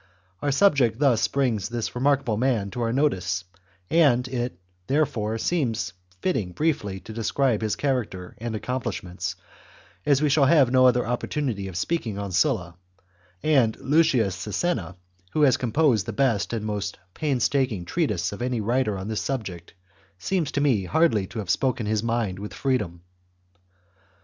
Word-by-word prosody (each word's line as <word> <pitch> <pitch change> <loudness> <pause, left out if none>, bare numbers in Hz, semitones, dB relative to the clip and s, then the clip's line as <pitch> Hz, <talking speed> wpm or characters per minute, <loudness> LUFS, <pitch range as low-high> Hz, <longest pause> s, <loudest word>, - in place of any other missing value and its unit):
Our 145 - +1
subject 135 - +3
thus 130 -5 +3
brings 120 -7 0
this 115 -2 -3
remarkable 135 -2 +1
man 110 -4 0
to 120 - -4
our 115 -1 0
notice, 95 - 0 0.4
and 130 - +4
it, 125 -6 -3 0.3
there 150 +5 +3
fore, 110 -3 -3
seems 115 - -1 0.3
fitting 100 - -1
briefly 100 - -1
to 110 - -9
describe 115 +2 +1
his 110 -1 0
character 115 -10 -2
and 115 0 -4
accomplishments, 110 -6 -4 0.7
as 140 -2 +3
we 150 - +2
shall 140 0 +4
have 140 -5 +5
no 130 0 +6
other 125 0 +3
oppor 120 +1 -2
tunity 115 -10 -2
of 90 - -6
speaking 115 - -2
on 100 -1 -4
Sulla, 90 - +1 0.7
and 130 -8 +3
Lucius 135 - +2
Sisenna, 105 - -2 0.4
who 155 - +2
has 135 -3 +6
composed 120 -4 +2
the 115 - -3
best 115 -3 +1
and 110 -2 -3
most 105 -1 -3 0.2
painstaking 130 - 0
treatise 100 - -1
of 100 - -7
any 125 -1 -1
writer 110 -1 0
on 95 +1 -5
this 110 -1 -2
subject, 95 -11 -5 0.4
seems 165 - -1
to 145 - 0
me 120 -10 +2
hardly 130 - +2
to 115 - -9
have 100 -5 -1
spoken 125 -4 0
his 105 0 0
mind 115 -5 -1
with 105 +1 -7
freedom. 105 -11 -1
120 Hz, 160 wpm, -25 LUFS, 105-140 Hz, 0.7 s, no